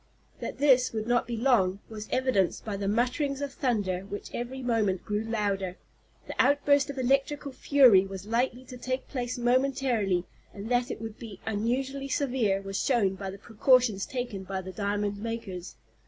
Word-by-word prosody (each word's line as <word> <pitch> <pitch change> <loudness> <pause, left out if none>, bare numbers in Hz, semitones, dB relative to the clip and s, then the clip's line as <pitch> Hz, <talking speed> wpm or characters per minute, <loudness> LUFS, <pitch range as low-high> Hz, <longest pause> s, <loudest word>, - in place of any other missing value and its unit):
That - - -5
this 260 -4 +4
would 215 -1 -2
not 240 +1 +1
be 235 -1 -3
long 220 -7 +3
was 215 -1 -8
evidenced 255 -8 +1
by 210 -2 -3
the 200 0 -3
mutterings 255 +6 0
of 285 -1 -4
thunder 205 -10 0
which 200 +2 -7
every 255 +2 -4
moment 215 -6 0
grew 210 0 -1
louder. 200 -4 -1 0.5
The - - -6
outburst 285 +1 +4
of 280 - -5
electrical 275 +3 +1
fury 255 -9 +5
was 195 0 -7
likely 245 +3 -1
to 250 - -9
take 255 +1 -3
place 250 -3 -3
momentarily, 245 -7 +1 0.3
and 205 +2 -6
that 245 0 +2
it - - -5
would 225 -1 -7
be 210 -5 -9
unusually 260 +6 -1
severe 245 -9 +1
was 195 0 -2
shown 225 -8 +2
by 195 0 -5
the 195 - -7
precautions 230 -1 +2
taken 245 -6 -4
by 190 0 -4
the 185 0 -7
diamond 205 0 -2
makers. 205 -5 -5
230 Hz, 170 wpm, -28 LUFS, 200-260 Hz, 0.5 s, fury